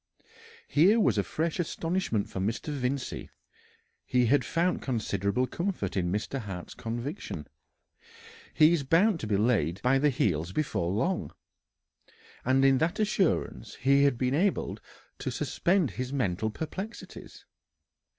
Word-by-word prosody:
Here 185 Hz, -, +5 dB
was -, -, +3 dB
a -, -, +2 dB
fresh 165 Hz, +2 st, -2 dB
astonishment 165 Hz, -, -1 dB
for -, -, -6 dB
Mr. 110 Hz, +10 st, -2 dB
Vincey. 130 Hz, 0 st, -3 dB, 0.7 s
He 125 Hz, -1 st, +2 dB
had 130 Hz, +3 st, +3 dB
found 175 Hz, +2 st, 0 dB
considerable 110 Hz, -1 st, 0 dB
comfort 170 Hz, -, -3 dB
in 90 Hz, -2 st, 0 dB
Mr. 105 Hz, +7 st, -2 dB
Hart's 95 Hz, -6 st, -7 dB
conviction: 120 Hz, -, -5 dB, 1.1 s
"He 155 Hz, +1 st, +5 dB
is 170 Hz, -, +1 dB
bound 165 Hz, +7 st, +3 dB
to 110 Hz, -, -4 dB
be 105 Hz, -2 st, +1 dB
laid 100 Hz, -6 st, +1 dB
by 130 Hz, +2 st, +4 dB
the 150 Hz, +2 st, +4 dB
heels 90 Hz, -, 0 dB
before 135 Hz, -, -1 dB
long," 175 Hz, -, -1 dB, 1.1 s
and 130 Hz, +2 st, +3 dB
in 135 Hz, -1 st, +5 dB
that 165 Hz, +5 st, 0 dB
assurance 200 Hz, -4 st, 0 dB
he 140 Hz, +2 st, +3 dB
had 140 Hz, -4 st, +3 dB
been 125 Hz, +1 st, 0 dB
able 190 Hz, +7 st, 0 dB, 0.4 s
to -, -, -3 dB
suspend 175 Hz, -, +1 dB
his 125 Hz, +4 st, -4 dB
mental 110 Hz, -6 st, 0 dB
perplexities. 190 Hz, -, -7 dB
135 Hz, 135 wpm, -29 LUFS, 110-165 Hz, 1.1 s, Here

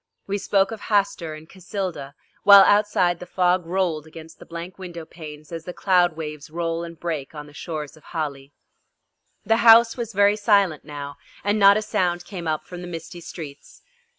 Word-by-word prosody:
We 200 Hz, +1 st, -2 dB
spoke 195 Hz, 0 st, +1 dB
of 220 Hz, -2 st, -7 dB
Hastur 195 Hz, -6 st, 0 dB
and 155 Hz, -, -11 dB
of -, -, -32 dB
Cassilda, 180 Hz, -7 st, -5 dB, 0.3 s
while 200 Hz, -1 st, +9 dB
outside 200 Hz, -4 st, +3 dB
the 180 Hz, -, -9 dB
fog 180 Hz, -1 st, +1 dB
rolled 170 Hz, -4 st, -1 dB
against 160 Hz, 0 st, -12 dB
the -, -, -13 dB
blank 170 Hz, +3 st, -8 dB
window 175 Hz, -3 st, -8 dB
panes 155 Hz, -2 st, -11 dB
as 165 Hz, -1 st, -6 dB
the 180 Hz, -, -6 dB
cloud 175 Hz, -4 st, +2 dB
waves 150 Hz, -2 st, -7 dB
roll 165 Hz, +1 st, -2 dB
and 170 Hz, -1 st, -9 dB
break 160 Hz, -4 st, -4 dB
on 150 Hz, -1 st, -7 dB
the 145 Hz, -, -16 dB
shores 150 Hz, -1 st, -6 dB
of 155 Hz, -, -20 dB
Hali. 145 Hz, -4 st, -5 dB, 0.9 s
The 225 Hz, +2 st, +3 dB
house 230 Hz, 0 st, +7 dB
was 230 Hz, -2 st, -4 dB
very 205 Hz, +1 st, +4 dB
silent 200 Hz, -7 st, +2 dB
now, 145 Hz, -1 st, -8 dB, 0.3 s
and 205 Hz, +1 st, +1 dB
not 200 Hz, 0 st, +7 dB
a 215 Hz, -, -1 dB
sound 175 Hz, -4 st, -1 dB
came 175 Hz, -3 st, -7 dB
up 155 Hz, -1 st, -2 dB
from 180 Hz, -1 st, -9 dB
the 180 Hz, -, -7 dB
misty 175 Hz, +1 st, -8 dB
streets. 150 Hz, -4 st, -10 dB
175 Hz, 190 wpm, -23 LUFS, 155-195 Hz, 0.9 s, while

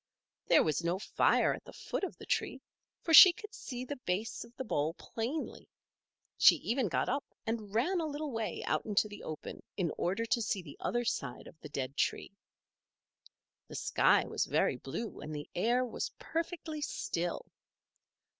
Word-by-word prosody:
There -, -, +6 dB
was 155 Hz, +1 st, 0 dB
no 170 Hz, +2 st, +1 dB
fire 200 Hz, -, +3 dB
at -, -, -8 dB
the -, -, -12 dB
foot -, -, -4 dB
of 385 Hz, -, -3 dB
the -, -, -11 dB
tree, -, -, -1 dB, 0.4 s
for 325 Hz, -, 0 dB
she 365 Hz, +4 st, +12 dB
could 425 Hz, +5 st, -11 dB
see 250 Hz, -, -6 dB
the 285 Hz, +3 st, -5 dB
base 190 Hz, +5 st, -1 dB
of 235 Hz, 0 st, -17 dB
the 260 Hz, -, -3 dB
bole 160 Hz, -, -1 dB
plainly. 245 Hz, +8 st, -5 dB, 0.7 s
She -, -, +9 dB
even 245 Hz, -1 st, 0 dB
got 170 Hz, -, 0 dB
up 280 Hz, +2 st, 0 dB, 0.2 s
and 220 Hz, -3 st, -3 dB
ran 345 Hz, +11 st, +2 dB
a 320 Hz, -, -1 dB
little 295 Hz, 0 st, -4 dB
way 225 Hz, -2 st, -3 dB
out -, -, 0 dB
into 210 Hz, 0 st, +1 dB
the 205 Hz, 0 st, -10 dB
open 155 Hz, -, -7 dB, 0.2 s
in 175 Hz, -5 st, 0 dB
order 195 Hz, +6 st, 0 dB
to 235 Hz, +1 st, +1 dB
see 200 Hz, -3 st, -1 dB
the 145 Hz, -4 st, -11 dB
other 240 Hz, 0 st, -1 dB
side 140 Hz, -, -3 dB
of 160 Hz, -, -14 dB
the 150 Hz, -, -10 dB
dead 135 Hz, -1 st, -4 dB
tree. -, -, 0 dB, 1.4 s
The -, -, -9 dB
sky -, -, +3 dB
was -, -, -1 dB
very -, -, +1 dB
blue, 230 Hz, -1 st, -5 dB
and 155 Hz, 0 st, -6 dB
the 145 Hz, -, -6 dB
air 240 Hz, +7 st, +2 dB
was 240 Hz, -, -3 dB
perfectly 325 Hz, -2 st, -4 dB
still. 175 Hz, -10 st, -2 dB
225 Hz, 180 wpm, -32 LUFS, 175-280 Hz, 1.4 s, she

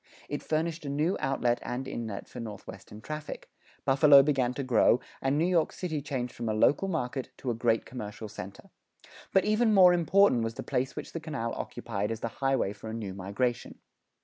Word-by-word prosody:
It 145 Hz, -, -3 dB
furnished 160 Hz, +1 st, -1 dB
a 140 Hz, -, -4 dB
new 150 Hz, +6 st, +1 dB
outlet 125 Hz, -4 st, +1 dB
and 130 Hz, +2 st, -4 dB
inlet 110 Hz, -6 st, -5 dB
for -, -, -9 dB
northwestern 105 Hz, -1 st, -9 dB
traffic; 150 Hz, +4 st, -7 dB, 0.3 s
Buffalo 140 Hz, +1 st, +7 dB
began 135 Hz, -4 st, +1 dB
to 140 Hz, -, -3 dB
grow, 125 Hz, -1 st, +4 dB, 0.2 s
and 135 Hz, +2 st, +1 dB
New 160 Hz, -, +2 dB
York 175 Hz, -3 st, +2 dB
City 160 Hz, -5 st, -3 dB
changed 130 Hz, -4 st, -3 dB
from 115 Hz, -1 st, -4 dB
a 110 Hz, -, 0 dB
local 145 Hz, -, +3 dB
market 135 Hz, -7 st, -2 dB
to 125 Hz, -, -2 dB
a -, -, 0 dB
great 115 Hz, 0 st, +1 dB
commercial 110 Hz, -3 st, -7 dB
center. 100 Hz, -1 st, -10 dB, 0.6 s
But 190 Hz, -, +3 dB
even 215 Hz, +1 st, +3 dB
more 180 Hz, -2 st, +8 dB
important 175 Hz, -5 st, +4 dB
was 115 Hz, 0 st, -3 dB
the -, -, -6 dB
place 130 Hz, -1 st, -1 dB
which -, -, -7 dB
the 165 Hz, -, -3 dB
canal 140 Hz, -8 st, -4 dB
occupied 105 Hz, -2 st, -4 dB
as 115 Hz, 0 st, -4 dB
the 115 Hz, -, -2 dB
highway 135 Hz, -7 st, +1 dB
for 110 Hz, -, -9 dB
a 110 Hz, -, -4 dB
new 105 Hz, -4 st, -5 dB
migration. 105 Hz, +6 st, -2 dB
130 Hz, 195 wpm, -29 LUFS, 115-155 Hz, 0.6 s, more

